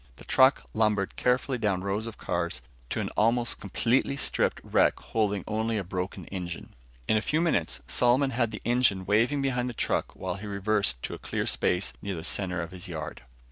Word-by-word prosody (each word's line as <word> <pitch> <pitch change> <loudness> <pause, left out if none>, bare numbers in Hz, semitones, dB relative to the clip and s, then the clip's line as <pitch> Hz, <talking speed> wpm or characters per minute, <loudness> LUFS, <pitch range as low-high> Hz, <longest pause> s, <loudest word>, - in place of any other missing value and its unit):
The - - -14
truck 130 +2 +5
lumbered 105 -3 +1
carefully 125 +1 +1
down 100 -4 0
rows 100 +3 -1
of 115 - -8
cars 85 -7 -2 0.3
to - - -2
an - - -2
almost 120 +2 +1
completely 120 +7 +1
stripped - - +1
wreck - - +3
holding 105 -4 -1
only 110 +1 0
a 100 - -1
broken 90 +1 -4
engine. 90 -3 -6 0.3
In 110 - +4
a - - +1
few 155 +9 0
minutes, 160 - +1
Solomon 130 +3 +3
had 120 -2 +1
the 105 - -8
engine 120 -6 +3
waving 120 +8 +2
behind 125 -2 0
the 120 - -7
truck - - -1
while 90 0 -4
he 105 +2 -7
reversed 100 - 0
to - - -3
a - - -7
clear - - -2
space 90 +2 +1
near 100 -2 -3
the 80 - -6
center 90 -1 0
of 85 - -8
his 90 +1 -7
yard. 80 -3 -6
105 Hz, 195 wpm, -28 LUFS, 95-120 Hz, 0.3 s, truck